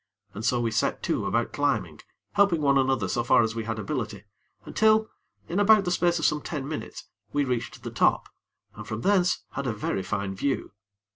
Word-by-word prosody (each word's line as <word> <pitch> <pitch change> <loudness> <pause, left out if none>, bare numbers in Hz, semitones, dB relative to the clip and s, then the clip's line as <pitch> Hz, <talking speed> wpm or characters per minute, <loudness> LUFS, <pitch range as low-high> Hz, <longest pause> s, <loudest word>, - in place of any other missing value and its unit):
And 105 - -7
so 125 +1 +2
we 115 -1 0
set 110 - 0
to - - -1
about - - 0
climbing, - - -1 0.3
helping 200 -5 +3
one 140 -2 +3
another 130 -7 +1
so 120 +5 -1
far 120 - +5
as 110 0 -1
we 115 -1 -4
had 110 0 -3
ability, 110 -5 -4 0.4
until, 220 0 +3 0.4
in 180 - -1
about 205 0 +5
the 175 - 0
space 175 -1 +2
of 160 - -1
some 150 0 +2
ten 145 -4 -5
minutes, 155 0 -6 0.3
we 145 -1 +2
reached 125 -3 -3
the - - -5
top, - - +2 0.5
and - - -9
from 110 +1 -4
thence 185 0 +2
had 140 -1 -4
a 115 - 0
very 105 -2 -2
fine 100 +1 -3
view. 135 +8 -2
135 Hz, 200 wpm, -26 LUFS, 110-175 Hz, 0.5 s, far